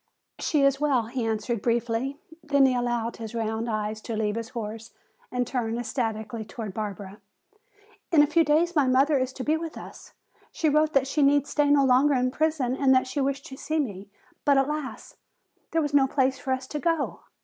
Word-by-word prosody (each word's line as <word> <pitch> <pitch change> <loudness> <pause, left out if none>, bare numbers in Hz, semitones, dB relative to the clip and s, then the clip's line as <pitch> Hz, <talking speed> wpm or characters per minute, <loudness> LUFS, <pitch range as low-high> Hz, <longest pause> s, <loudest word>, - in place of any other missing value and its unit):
"She 295 -3 +1
is 275 0 +3
well," 275 -5 +2
he 235 +1 -3
answered 220 0 -2
briefly. 235 +4 -1 0.3
Then 280 -2 +4
he 260 - +3
allowed 240 -1 -1
his 225 0 -7
round 225 +1 -2
eyes 215 0 -2
to 230 - -5
leave 210 -1 0
his 230 0 -5
horse 225 -2 -7 0.4
and 250 0 0
turn 235 -3 -2
ecstatically 225 -2 -3
toward 215 -2 -7
Barbara. 205 -1 -6 0.9
"In 305 -3 +6
a - - +5
few 330 +3 +3
days 325 +4 +2
my 290 -4 +3
mother 270 +3 +3
is 260 0 -1
to 260 - -6
be 310 +3 +1
with 325 -1 -6
us. - - -11 0.4
She 315 - 0
wrote 305 +1 +2
that 275 -1 +3
she 295 +3 -1
need 285 0 +4
stay 295 -1 +1
no 285 -1 +5
longer 265 +3 +4
in 255 0 +1
prison 295 -4 0
and 265 -1 +4
that 255 - +3
she 270 +2 -3
wished 275 0 -1
to 265 - -9
see 315 +2 -2
me, 205 -9 -3 0.3
but 280 -1 +4
alas, 285 0 -3 0.5
there 325 -1 +1
was 290 -1 -3
no 275 -2 +5
place 265 -1 +1
for 265 - -4
us 260 0 -1
to 300 - -3
go! 330 -2 -1
260 Hz, 205 wpm, -26 LUFS, 230-290 Hz, 0.9 s, In